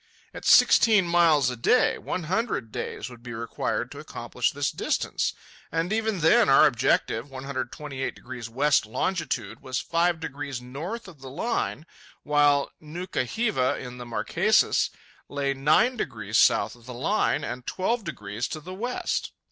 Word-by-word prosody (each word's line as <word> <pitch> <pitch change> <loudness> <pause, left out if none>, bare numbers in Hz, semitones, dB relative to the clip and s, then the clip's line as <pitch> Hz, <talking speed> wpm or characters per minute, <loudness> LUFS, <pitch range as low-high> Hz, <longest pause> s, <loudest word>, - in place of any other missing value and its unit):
At - - -9
sixteen 215 -5 +6
miles 165 -6 +4
a - - -5
day, 250 - +3
one 180 - -4
hundred 185 - -1
days - - -5
would 120 -2 -12
be 120 -1 -8
required 115 0 -3
to - - -9
accomplish - - -2
this - - -1
distance. - - -1 0.4
And 170 +5 -1
even 220 -4 0
then, 160 -3 +5
our 135 - +7
objective, 120 -1 +1
128° 130 -2 -5
west 140 0 +2
longitude, 165 - -2
was 130 -1 -3
five 170 0 +1
degrees 140 -4 -5
north 160 - -6
of 165 -8 -14
the 135 - -8
Line, 160 - -2 0.4
while 145 -1 +3
Nuka 165 -2 -4
hiva, 205 - 0
in 125 -1 -8
the 120 - -7
Marquesas, 115 - +2 0.4
lay 140 -1 -1
nine 155 - +3
degrees - - -1
south - - +4
of 120 0 -19
the 125 - -7
Line 150 - +1
and 125 -2 -6
twelve 225 +5 -1
degrees 105 - -4
to 155 - -5
the 180 +5 -9
west! 240 +6 -3
145 Hz, 150 wpm, -26 LUFS, 125-180 Hz, 0.4 s, our